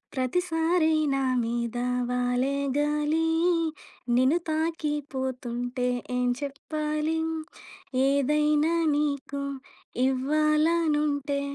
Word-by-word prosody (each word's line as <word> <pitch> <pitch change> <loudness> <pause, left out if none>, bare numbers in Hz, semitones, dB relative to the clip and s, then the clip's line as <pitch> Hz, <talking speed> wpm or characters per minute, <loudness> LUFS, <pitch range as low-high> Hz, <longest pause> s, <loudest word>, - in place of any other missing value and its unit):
ప్రతిసారీ 325 +4 +1 0.2
నామీదా 240 -2 0 0.2
వాలే 250 +2 0 0.2
గాలీ 300 +2 +1 0.9
నిను 260 +7 +4
తాకీ 315 -1 -1 0.2
పోతుంటే 250 -1 -3 0.3
ఏం 250 0 +1
చెప్పాలి 300 +2 -2 0.9
ఏదైనా 300 +3 +2 0.2
నీకు 280 -1 -1 0.7
ఇవ్వాల 305 +4 +2 0.3
నుంటే 285 -1 0
285 Hz, 70 wpm, -27 LUFS, 255-305 Hz, 0.9 s, నిను